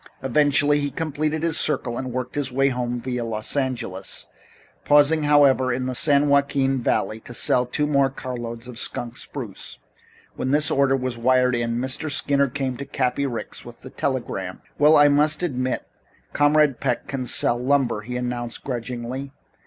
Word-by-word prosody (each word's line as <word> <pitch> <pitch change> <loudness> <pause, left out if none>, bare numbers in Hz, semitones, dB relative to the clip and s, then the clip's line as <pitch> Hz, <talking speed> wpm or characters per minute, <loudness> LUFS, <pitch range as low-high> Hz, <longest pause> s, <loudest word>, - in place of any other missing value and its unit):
Eventually 145 +2 +3
he 145 0 -1
completed 155 0 -2
his 165 -2 +3
circle 125 -5 +1
and 130 0 -4
worked 125 0 -4
his 145 -3 -2
way 135 +2 +2
home, 125 -1 -2
via 125 -1 -3
Los 110 +1 -3
Angeles, 120 -9 -3 0.6
pausing 145 +2 +4
however, 140 -3 +4
in 125 +1 -2
the 130 - -2
San 145 +2 +3
Joaquin 140 -2 +2
Valley 110 -1 0
to 120 +2 -11
sell 125 +2 +2
two 150 +4 0
more 140 -2 +2
carloads 120 -3 -6
of 125 -1 -8
skunk 120 -1 -2
spruce. 125 -7 -6 0.6
When 130 - -3
this 150 +2 +3
order 135 -1 +3
was 130 -2 -4
wired 125 +1 +3
in, 115 0 -1
Mr. 130 +5 -2
Skinner 140 0 +2
came 130 -1 -3
to 140 - -6
Cappy 135 0 -1
Ricks 120 -3 -6
with - - -13
the - - -11
telegram. - - -3 0.2
"Well, 150 +2 +6
I 145 0 +7
must 150 +3 +2
admit 130 -6 -2 0.5
Comrade 145 -3 +3
Peck 125 -3 -1
can 130 -2 -4
sell 120 - +2
lumber," 135 -5 +1
he 125 +4 -5
announced 120 -1 -4
grudgingly. 125 +2 -5
130 Hz, 170 wpm, -23 LUFS, 125-145 Hz, 0.6 s, I